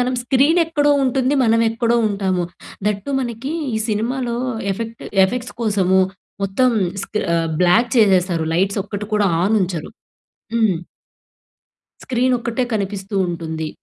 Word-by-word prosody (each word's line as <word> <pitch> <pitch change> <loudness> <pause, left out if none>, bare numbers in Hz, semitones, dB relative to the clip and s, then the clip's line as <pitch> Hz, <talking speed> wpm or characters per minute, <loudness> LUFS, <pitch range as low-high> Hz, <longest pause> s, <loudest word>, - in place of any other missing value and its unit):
మనం 250 +1 +1
స్క్రీన్ 275 +7 +3
ఎక్కడో 295 -3 +2
ఉంటుంది, 260 +1 +1
మనం 225 0 +3
ఎక్కడో 235 +1 +1
ఉంటాము. 190 -3 -1 0.4
దట్ 210 -1 0
టు - - -3
మనకి, 240 +2 -4 0.2
ఈ - - 0
సినిమాలో 235 +3 -1 0.4
ఎఫెక్ట్ 230 +3 -6 0.2
ఎఫెక్ట్స్ 245 +5 -3
కోసము 195 -4 +2 0.4
మొత్తం 200 +7 +2 0.3
స్క్రీ 210 - -3 0.4
బ్లాక్ 225 +8 +4
చేసేస్తారు. 185 -6 +3
లైట్స్ 195 +4 +1
ఒక్కటి 205 0 -5
కూడా 210 -1 +3 0.2
ఆన్ 215 +4 +2
ఉంచరు. 175 -4 -4 0.6
హ్మ్. 220 -6 +2 1.3
స్క్రీన్ 255 0 +1
ఒక్కటే 235 +2 -2
కనిపిస్తూ 200 -1 -3
ఉంటుంది. 160 -2 -4
220 Hz, 125 wpm, -20 LUFS, 190-245 Hz, 1.3 s, బ్లాక్